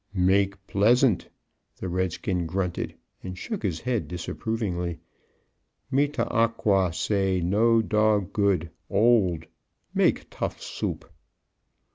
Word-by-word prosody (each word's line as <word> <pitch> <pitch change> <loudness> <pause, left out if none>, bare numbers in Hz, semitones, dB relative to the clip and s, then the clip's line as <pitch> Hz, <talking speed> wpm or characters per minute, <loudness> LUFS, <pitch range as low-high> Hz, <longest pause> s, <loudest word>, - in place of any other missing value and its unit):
"Make 100 +1 +2
pleasant?" 115 +2 +3 0.5
the - - -5
redskin 90 0 -1
grunted, 90 0 -2 0.3
and 90 0 -7
shook 215 - -4
his 90 -6 -1
head 120 - -1
disapprovingly. 90 0 -3 0.9
"Me 140 +2 +3
tah 140 -5 -2
ah 115 0 +4
qua 100 -5 +1
say 95 +2 0
no 110 +6 +3
dog 105 -3 +2
good 95 -6 +1 0.2
old 100 -6 +3 0.5
make - - +2
tough - - -4
soup." - - -4
100 Hz, 110 wpm, -26 LUFS, 90-110 Hz, 0.9 s, ah